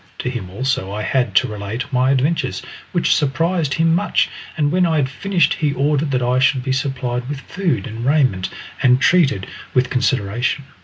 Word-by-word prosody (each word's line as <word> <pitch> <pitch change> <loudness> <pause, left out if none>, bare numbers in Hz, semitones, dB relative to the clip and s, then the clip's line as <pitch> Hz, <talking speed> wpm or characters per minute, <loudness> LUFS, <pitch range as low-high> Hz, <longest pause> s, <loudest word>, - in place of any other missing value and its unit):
To 125 - -3
him 110 -8 -5
also 105 -2 -2
I 105 +1 -4
had 125 -6 0
to - - +4
relate 110 +7 -5
my 130 +1 +3
adventures, 140 +5 0 0.3
which 175 - +2
surprised 155 +1 0
him 165 0 +2
much, 170 - +1 0.3
and 145 -2 +1
when 185 +2 +2
I 165 -2 +2
had 145 -4 +2
finished 180 +5 +1
he 150 -3 0
ordered 145 +2 +1
that 130 -2 0
I 125 +1 +2
should 135 -1 +2
be 135 - -2
supplied 130 -2 -2
with 145 -2 -4
food 175 - -2
and 115 +2 -6
raiment 130 -9 +2 0.3
and 125 0 +4
treated 140 - +3 0.3
with 125 -1 +2
consideration. 125 +1 0
135 Hz, 185 wpm, -19 LUFS, 125-150 Hz, 0.3 s, to